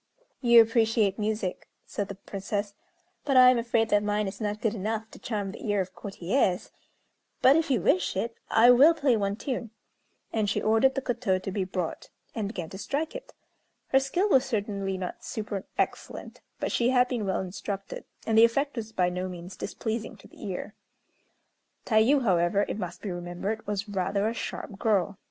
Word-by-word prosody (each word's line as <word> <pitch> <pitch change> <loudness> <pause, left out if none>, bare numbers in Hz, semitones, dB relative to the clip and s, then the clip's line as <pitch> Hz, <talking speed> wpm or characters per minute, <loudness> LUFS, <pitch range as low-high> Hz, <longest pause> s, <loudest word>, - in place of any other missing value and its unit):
"You 235 -2 +8
appreciate 225 -3 +1
music," 210 -3 -2 0.2
said 205 - -3
the 200 - -7
Princess; 200 +1 -4 0.5
"but 275 -2 +2
I 255 0 +9
am 250 - +1
afraid 230 -1 +1
that 205 -1 +4
mine 210 0 0
is 200 +3 -7
not 210 0 -2
good 220 -2 0
enough 220 +1 -3
to - - -12
charm 205 -4 -3
the 210 - -10
ear 205 -2 +1
of 185 -1 -3
courtiers; 195 0 -1 0.7
but, 265 +2 +7
if 325 -1 +1
you 250 -8 +2
wish 185 +1 +2
it, 230 +3 -2
I 235 +2 +7
will 285 +7 +7
play 280 -6 +2
one 200 -2 0
tune." 240 0 -4 0.6
And 215 -2 +1
she - - 0
ordered 225 +5 +3
the 270 - -2
koto 235 -7 0
to 190 +1 -5
be 190 0 -1
brought, 185 -2 -4 0.2
and 215 -3 -2
began 180 -6 -5
to 190 - -8
strike 300 +8 -2
it. - - -8 0.6
Her 270 - +5
skill 345 +9 0
was 265 -10 +4
certainly 200 -4 -2
not 185 -1 -6
super 210 -3 -4
excellent; - - -3 0.2
but - - -2
she 240 0 +2
had 250 -1 +4
been 235 -5 -2
well 190 - 0
instructed, 195 +1 -5 0.2
and 225 - +1
the 225 - +8
effect 275 +4 +2
was 220 -1 -4
by 180 -5 +1
no 180 +1 -3
means 180 +1 -8
displeasing 220 +1 -4
to - - -16
the - - -15
ear. 200 +1 -5 1.1
Tayû, 240 +5 +4
however, 185 0 +2
it - - -4
must 180 -2 -6
be 200 - -3
remembered, 175 +5 -4
was 205 +1 -2
rather 200 +1 0
a 225 - -1
sharp 205 -3 -6
girl. 200 -3 +1
210 Hz, 190 wpm, -27 LUFS, 195-235 Hz, 1.1 s, I